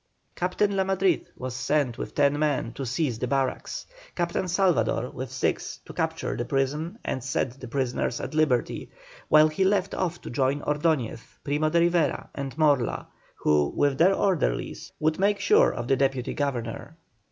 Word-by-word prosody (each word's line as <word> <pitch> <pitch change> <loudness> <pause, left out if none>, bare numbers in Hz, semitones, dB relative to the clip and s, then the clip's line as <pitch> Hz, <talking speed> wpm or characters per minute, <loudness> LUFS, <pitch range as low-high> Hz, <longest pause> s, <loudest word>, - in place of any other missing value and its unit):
Captain 195 +3 0
La 190 - +2
Madrid 190 -3 +1
was 130 -1 -5
sent 130 -1 0
with - - -6
ten 145 0 +3
men 145 -6 0
to 135 -1 -5
seize 130 -2 -1
the 125 - -1
barracks, 135 0 -2 0.3
Captain 175 +2 -1
Salvador, 175 - +1
with 130 0 -6
six, 130 -1 -1
to - - -10
capture - - -2
the 120 - -2
prison 145 - -1
and 130 - -2
set 130 0 -2
the 130 - -8
prisoners 125 -1 -1
at - - -5
liberty; 150 -6 +1 0.4
while 155 0 +7
he 155 +5 0
went 195 0 +1
off 175 -2 -2
to - - -8
join 135 +3 +1
Ordoñez, 150 -6 0 0.2
Primo 150 +2 +1
de 170 +2 +3
Rivera, 170 -2 +1
and 140 0 -5
Morla, 145 -6 +2 0.3
who, 75 -1 +2
with 140 -2 +2
their 185 +4 +5
orderlies, 175 - -1
would 155 +2 +1
make 200 +1 +2
sure 200 - +5
of 120 -1 -5
the 135 - +3
Deputy 135 -2 0
Governor. 140 +1 -3
145 Hz, 170 wpm, -26 LUFS, 130-170 Hz, 0.4 s, while